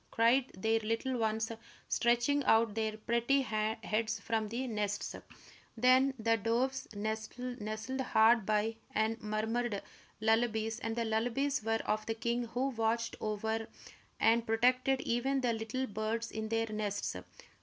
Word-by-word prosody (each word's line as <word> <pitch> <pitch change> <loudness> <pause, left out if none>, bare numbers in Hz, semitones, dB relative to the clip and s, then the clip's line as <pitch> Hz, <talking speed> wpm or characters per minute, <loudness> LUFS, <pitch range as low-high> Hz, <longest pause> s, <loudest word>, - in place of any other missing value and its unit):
cried 240 +3 +3
their 220 +3 +2
little 225 +4 -1
ones, 220 -1 0 0.4
stretching 240 +5 +2
out 225 -1 +4
their 220 0 -2
pretty 235 +5 +2
heads 220 0 -1
from 220 -1 -1
the 240 +4 -2
nests. 210 -3 -2 0.6
Then 255 +3 +4
the 225 0 +2
doves 245 +5 0
nestled 220 +3 -4
hard 230 -2 +4
by 215 +2 0 0.2
and 220 +1 +1
murmured 215 +1 -1 0.4
lullabies, 220 0 +1
and 225 0 -3
the 235 -1 -1
lullabies 245 +6 0
were 225 0 0
of 215 0 0
the 225 - -1
king 235 +1 -1
who 250 +4 -1
watched 230 -1 0
over 220 +1 -2 0.5
and 230 +1 +4
protected 255 +4 +3
even 265 +3 0
the 245 -2 +1
little 225 +4 -2
birds 220 +1 -3
in 220 0 -4
their 225 0 +1
nests. 205 - -2
225 Hz, 135 wpm, -33 LUFS, 220-240 Hz, 0.6 s, out